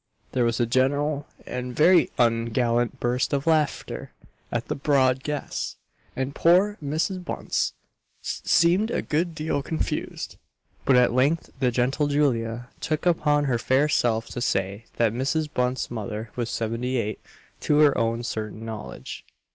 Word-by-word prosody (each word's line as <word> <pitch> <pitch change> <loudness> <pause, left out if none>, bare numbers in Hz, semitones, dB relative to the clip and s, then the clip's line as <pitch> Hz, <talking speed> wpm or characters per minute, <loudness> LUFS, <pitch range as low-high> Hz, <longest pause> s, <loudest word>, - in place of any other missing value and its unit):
There 125 -2 +1
was 115 -1 0
a 120 - +3
general 140 +4 +1 0.2
and 125 -1 -5
very 175 +3 +5
ungallant 115 0 +1
burst 125 +3 0
of 140 0 0
laughter 155 -3 0 0.4
at - - -2
the - - -1
broad 135 -2 +2
guess; 150 +1 -3 0.4
and 130 +1 -2
poor 185 +7 +4
Mrs. 160 +6 -1
Bunce - - -1 0.5
seemed 180 +6 +2
a - - -1
good 165 +2 -1
deal 155 -2 -1
confused; 160 +3 -3 0.5
but 135 - +5
at 125 -1 +4
length 140 +6 +1
the 130 -2 +3
gentle 130 +5 +1
Julia 120 -5 0
took 155 +1 -2
upon 150 -4 +3
her 125 -4 +1
fair 130 +5 +3
self 115 -6 +1
to 120 - -5
say 100 0 -1
that 115 -2 +2
Mrs. 140 +5 0
Bunce's 125 0 -1
mother 110 -1 -5
was 120 -2 -2
seventy 115 +3 -2
eight, 110 -3 -2 0.4
to 150 - +2
her 150 -2 +6
own 115 +1 0
certain 110 -1 -4
knowledge. 110 -2 -7
130 Hz, 145 wpm, -25 LUFS, 115-150 Hz, 0.5 s, her